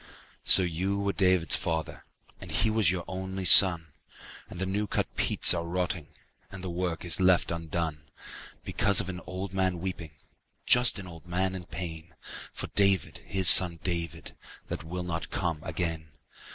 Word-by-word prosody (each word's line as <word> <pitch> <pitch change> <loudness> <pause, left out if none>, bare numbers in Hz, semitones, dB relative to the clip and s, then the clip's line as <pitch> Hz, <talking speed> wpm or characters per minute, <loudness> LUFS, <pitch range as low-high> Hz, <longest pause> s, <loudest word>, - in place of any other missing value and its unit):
lO 95 - -1
you 90 +4 -5
were 100 0 -4
David's 90 -3 +2
father, 80 -2 -6 0.3
And - - -12
he 110 - 0
was 110 -5 +1
your 90 -1 -4
only 95 0 -8
son, 85 -4 +7 0.6
And 85 - -12
the 95 - -3
new 100 +2 -4
cut - - -5
peats - - +4
are 85 -1 -5
rotting 90 -2 -5 0.4
And 95 -2 -12
the 90 - -7
work 90 -1 -6
is 85 - +3
left 90 -2 0
undone. 80 -3 -7 0.5
Because 100 -1 +3
of 90 - -4
an 90 -1 -9
old 95 +1 -9
man 95 -2 -3
weeping, 85 -4 -9 0.5
Just 125 -2 +2
an 100 - -10
old 85 -2 -15
man 95 +2 -3
in 90 -2 -10
pain. 80 -3 -9 0.4
For - - -7
David, 100 -2 0
his 95 -1 +1
son 85 -3 +9
David, 85 -3 -6 0.3
That - - -7
will 90 +2 -8
not 85 -2 -7
come 85 -4 -5
again. 80 -1 -5
90 Hz, 165 wpm, -25 LUFS, 85-95 Hz, 0.6 s, son